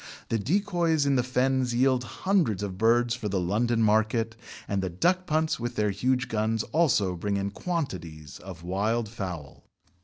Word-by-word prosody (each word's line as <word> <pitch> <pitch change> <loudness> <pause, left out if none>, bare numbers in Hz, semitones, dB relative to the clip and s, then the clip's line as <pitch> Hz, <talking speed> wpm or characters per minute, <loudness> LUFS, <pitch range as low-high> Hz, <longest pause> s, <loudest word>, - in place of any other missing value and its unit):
The 115 - 0
decoys 170 - +1
in 140 -1 +2
the 125 - +3
Fens 130 0 0
yield 130 0 +3 0.2
hundreds 165 - +2
of 95 -2 -4
birds 120 +1 +3
for 120 -3 -4
the 95 -1 0
London 115 +6 +1
market, 110 +1 +2 0.3
and 100 -1 -1
the 95 - -2
duck 180 - +1
punts 155 0 +1
with 120 0 -4
their 105 -1 +1
huge 125 +5 0
guns 110 0 0
also 120 - +2
bring 100 +3 -2
in 100 0 -2
quantities 90 - -5
of 90 -3 -10
wild 105 +6 0
fowl. 90 - -7
115 Hz, 165 wpm, -27 LUFS, 100-130 Hz, 0.3 s, the